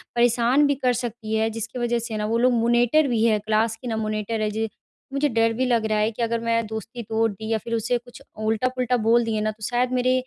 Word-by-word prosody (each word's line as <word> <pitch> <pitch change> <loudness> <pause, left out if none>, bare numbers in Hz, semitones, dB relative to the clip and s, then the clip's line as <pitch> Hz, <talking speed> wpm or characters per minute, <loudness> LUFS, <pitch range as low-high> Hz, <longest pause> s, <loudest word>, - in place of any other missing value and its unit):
परेशान 240 +4 +3
भी 285 - +1
कर 255 -2 +1
सकती 230 -2 -4
है, 220 0 +1
जिसकी 230 +3 -5
वजह 240 0 0
से 225 -2 -4
ना 210 - -2
वो 225 +2 0
लोग 250 +1 +3
मॉनिटर 240 +5 +3
भी 230 -3 +1
है, 215 -2 +4
क्लास 215 +1 +1
की 250 - -7
ना 225 - -1
मॉनिटर 215 0 -2
है। 215 - +1
ज 220 +1 -1 0.5
मुझे 285 +1 +2
डर 230 -1 +2
भी 255 +3 0
लग 235 -3 +1
रहा 215 -1 0
है 215 +1 +2
कि 230 - -7
अगर 230 0 0
मैं 230 0 0
दोस्ती 225 +2 -6
तोड़ 225 +1 0
दी 220 +2 -8
या 220 - +2
फिर 230 +1 -6
उसे 240 +2 0
कुछ 245 +1 -14 0.2
उल्टा-पुल्टा 250 +3 0
बोल 235 +1 +4
दिए 220 -1 -1
ना, 215 0 0
तो 215 0 -14
शायद 245 +2 0
मेरे 255 0 +2
230 Hz, 250 wpm, -24 LUFS, 220-245 Hz, 0.5 s, है